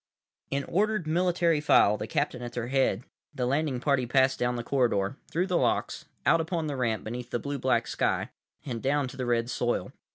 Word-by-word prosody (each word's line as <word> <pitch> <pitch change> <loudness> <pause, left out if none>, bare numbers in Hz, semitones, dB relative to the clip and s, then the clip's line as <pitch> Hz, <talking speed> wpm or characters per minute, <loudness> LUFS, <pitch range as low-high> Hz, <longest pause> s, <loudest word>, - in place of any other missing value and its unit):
———— - - -66
In 140 0 -1
ordered, 210 +1 0
military 170 -1 +2
file, 105 -7 +5
the 105 - -5
captain 125 - -1
at 120 -1 -6
their 120 0 -3
head, 130 -5 +1 0.3
the 125 -3 -1
landing 140 0 0
party 130 -2 +1
passed 130 +1 +3
down 125 0 0
the 120 - -3
corridor, 120 -5 +1
through 175 +3 0
the 180 -2 +1
locks, - - 0 0.2
out 165 - +4
upon 165 0 -2
the 145 -2 -3
ramp 115 -4 -1
beneath 120 +2 -6
the - - -1
blue 140 +3 -4
black 120 -2 +2
sky; - - -1 0.3
and 120 -5 -4
down 140 0 +1
to - - -10
the 130 -2 -3
red 120 -1 +1
soil. 120 -1 -1
130 Hz, 205 wpm, -28 LUFS, 120-150 Hz, 0.3 s, file